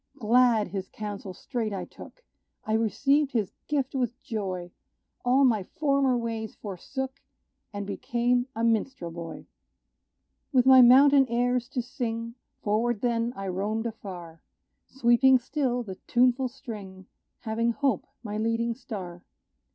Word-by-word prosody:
Glad, 230 -2 +3
his 190 0 -5
counsel 205 -2 -6
straight 225 +3 -4
I 195 - -4
took - - -14 0.4
I 215 - -1
received 275 +6 +2
his 215 -6 -1
gift 280 -3 -1
with 250 -2 -2
joy; 190 -7 -4 0.5
All 260 +3 +4
my 225 -5 +3
former 275 +3 +1
ways 225 -2 -4
forsook, 260 +7 -6 0.5
And 205 -1 -5
became 240 +4 0
a 230 - -2
minstrel 225 -5 0
boy. 165 0 -8 1.1
With 255 -3 +4
my 260 -1 +9
mountain 270 +2 +7
airs 245 +1 0
to 250 -3 -2
sing, 230 -1 -4 0.3
Forward 220 +1 0
then 235 -1 0
I 195 0 -5
roamed 210 +5 -2
afar, 180 -7 -7 0.5
Sweeping 260 +1 +4
still 250 -1 -1
the 190 -4 -8
tuneful 250 +1 +3
string 210 -8 -9 0.4
Having 230 +1 0
hope 270 -6 0 0.2
my 210 -1 -4
leading 230 +1 0
star. 190 -8 -8
235 Hz, 130 wpm, -27 LUFS, 210-255 Hz, 1.1 s, my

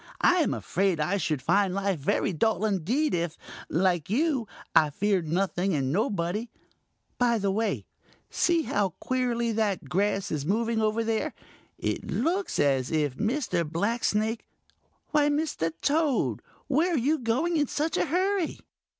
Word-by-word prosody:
I 360 - +5
am 330 - +2
afraid 190 -2 0
I 180 +7 +1
should 155 -7 -1
find 190 +4 +2
life 195 -4 0
very 145 +6 0
dull 215 +4 +1
indeed 220 - 0
if, 170 -1 -1 0.3
like 175 -2 +1
you, 265 0 +1 0.3
I 155 - +6
feared 185 +2 0
nothing 185 +1 0
and 135 -2 0
nobody. 205 +1 -1 0.7
By 240 -1 +3
the 200 -2 0
way, 220 +3 -1 0.5
see 340 -2 +2
how 200 - 0
queerly 240 -2 0
that 210 -3 -1
grass 195 +1 0
is 150 -3 -1
moving 225 +6 0
over 215 +1 +1
there. 225 +7 -1 0.4
It - - -3
looks 355 - 0
as 135 -3 +2
if 150 -5 0
Mr. 230 - 0
Blacksnake—Why, 220 - -2
Mr. 290 - -1
Toad, 295 -2 +1 0.2
where 330 +5 +2
are - - +2
you 290 +6 +1
going 260 +9 0
in 295 -2 +2
such 310 +5 -1
a - - +2
hurry?" 370 +2 0
215 Hz, 145 wpm, -27 LUFS, 180-270 Hz, 0.7 s, I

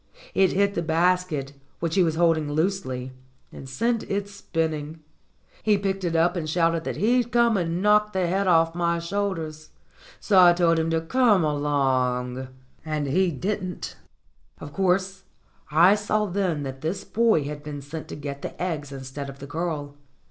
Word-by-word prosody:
It 190 -2 +3
hit 200 +1 +2
the 170 - -1
basket, 165 -3 0 0.3
which 165 -1 -2
he 195 - +3
was 165 -3 +2
holding 160 -3 +2
loose 190 +6 0
ly, 130 0 -5 0.4
and 135 - -10
sent 230 - 0
it 200 0 -1
spinning. 160 -5 -3 0.6
He 210 -2 +3
picked 195 -1 -2
it 170 -2 -1
up, 170 +3 +3
and 160 -3 -3
shouted 165 0 +1
that - - -3
he'd 240 +3 +1
come 235 -1 +3
and 175 0 -1
knock 210 0 +4
the 190 -2 0
head 190 +3 0
off 165 -2 +4
my 170 0 0
shoulders. 170 -4 -3 0.5
So 195 -3 +4
I 175 -1 +8
told 170 -1 +2
him 160 0 0
to 165 0 +1
come 210 +1 +3
along, 130 -4 0 0.4
and 155 -2 -2
he 180 +7 +2
didn't. 185 +3 -4 0.6
Of 145 - -9
course, 190 +1 0 0.4
I 170 +6 +6
saw 210 0 0
then 180 -6 -1
that 135 -1 -6
this 175 +6 -3
boy 225 -9 +2
had 145 +1 -6
been 145 -1 -7
sent 155 +3 -7
to - - -7
get 140 -1 -6
the - - -7
eggs 155 -6 -3
instead 135 +1 -7
of 135 - -10
the 140 - -9
girl. 150 -1 -4
165 Hz, 175 wpm, -25 LUFS, 150-190 Hz, 0.6 s, I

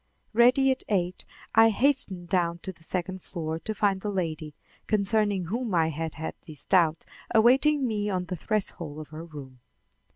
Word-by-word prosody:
Ready 250 +4 +5
at 260 - -2
eight, 180 -3 -1 0.3
I 225 0 +7
hastened 215 -7 +1
down 170 -1 +1
to 190 - -5
the 160 - -20
second 185 +2 -3
floor 160 -2 -4
to 215 +5 -5
find 195 -2 +1
the 210 - -3
lady, 160 -6 -3 0.3
concerning 205 -2 +1
whom 225 +2 -2
I 160 -1 +3
had 160 0 -4
had 160 - -5
these 155 -3 -10
doubts, 165 -4 +3 0.3
awaiting 265 +5 +4
me 210 -2 -1
on 185 -2 -1
the 180 - -4
threshold 175 -5 -3
of 155 -1 -8
her 155 +1 -8
room. 140 -6 -11
185 Hz, 170 wpm, -27 LUFS, 165-215 Hz, 0.3 s, I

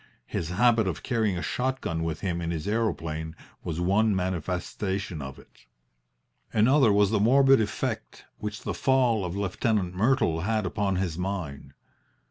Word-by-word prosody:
His 80 - -3
habit 110 +3 +3
of 90 - -3
carrying 110 -6 0
a 85 - -4
shot 130 +1 -1
gun 80 0 -3
with 80 -1 -3
him 85 -3 -2
in 85 - -2
his 80 -1 -3
aeroplane 80 -8 -2 0.3
was 85 -1 -3
one 100 +4 +2
manifestation 90 0 -3
of 65 -1 -7
it. - - -20 0.8
Another 120 +2 +4
was 100 0 +3
the 110 - +2
morbid 135 +3 +5
effect 105 -1 -4
which 105 0 -5
the - - -2
fall 125 -6 +2
of 90 0 -4
Lieutenant 100 -1 0
Myrtle 105 - +2
had 110 +2 0
upon 100 +1 -1
his 90 -3 -2
mind. 80 -8 -4
95 Hz, 155 wpm, -27 LUFS, 85-110 Hz, 0.8 s, morbid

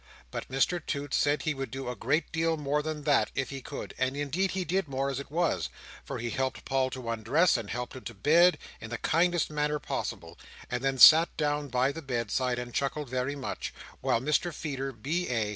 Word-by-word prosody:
But - - -5
Mr 140 +6 +1
Toots 145 -3 -2
said 145 +1 +2
he 155 - 0
would 135 -1 -5
do 135 0 -6
a 125 - -3
great 145 +9 0
deal 165 0 +1
more 150 0 0
than 155 -1 -4
that, 145 -1 +3
if 135 0 -2
he 135 -1 -6
could; - - -7
and 130 +2 0
indeed 150 +7 0
he 185 -1 -2
did 185 +1 0
more 135 0 -1
as 135 - -3
it 140 - -8
was: 170 +3 0 0.3
for - - -5
he 120 0 -3
helped 130 0 -2
Paul 135 -1 +1
to 130 -2 -7
undress, 115 - +3
and 100 - -3
helped 120 +2 -4
him 130 - -9
to 115 - -6
bed, 170 - +5 0.2
in 110 - -8
the 120 - -3
kindest 170 +4 +2
manner 150 0 0
possible, - - -5 0.3
and 125 +1 -2
then 135 0 +1
sat 160 +6 +9
down 145 -1 0
by 130 +1 +1
the 165 - -7
bedside 125 -1 -1
and 120 -1 -5
chuckled 140 0 -1
very 130 +2 -1
much; 135 -2 -5 0.3
while - - +2
Mr 150 +6 +1
Feeder, 135 -4 -4
B.A. 125 -3 -1
140 Hz, 210 wpm, -29 LUFS, 130-155 Hz, 0.3 s, sat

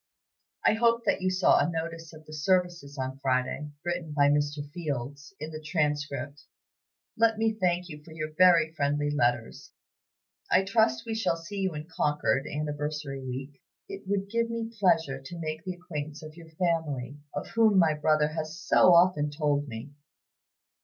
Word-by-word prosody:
I - - +6
hope 235 +1 +2
that - - +1
you 185 - +1
saw 185 0 +4
a - - +2
notice 165 -1 -5
of 155 -1 -14
the 155 - -11
services 170 -2 0
on 130 0 -4
Friday, 130 +2 -1 0.2
written 175 -3 -3
by 145 -1 +4
Mr. 145 0 0
Fields, 145 -3 -5
in 155 +1 -6
the 155 0 -7
'Transcript.' 145 -2 -2 0.7
"Let 225 -1 +3
me 225 0 +1
thank 180 -4 0
you 150 -3 -10
for 160 - -14
your 155 -1 -5
very 170 -3 +5
friendly 145 -1 0
letters. 120 -5 -1 0.8
I 190 - +4
trust 225 +3 +2
we 225 - -3
shall 220 -6 0
see 170 +5 -8
you 190 -4 -1
in 150 +1 -6
Concord, 150 -4 0
Anniversary 150 -2 -4
Week. 130 +2 -6 0.3
It 390 - -9
would 200 0 -1
give 230 0 +1
me 230 0 -4
pleasure 165 -8 +2
to 170 +6 -9
make 155 0 -4
the 185 -1 -3
acquaintance 155 -4 -6
of 155 0 -10
your 165 -1 -13
family, 155 -5 -2 0.2
of 145 - -4
whom 220 -3 +4
my 165 -4 +5
brother 150 0 +2
has 155 +1 -5
so 180 -2 +5
often 170 -4 +4
told 145 -1 0
me. 115 +3 -7
155 Hz, 170 wpm, -28 LUFS, 145-180 Hz, 0.8 s, I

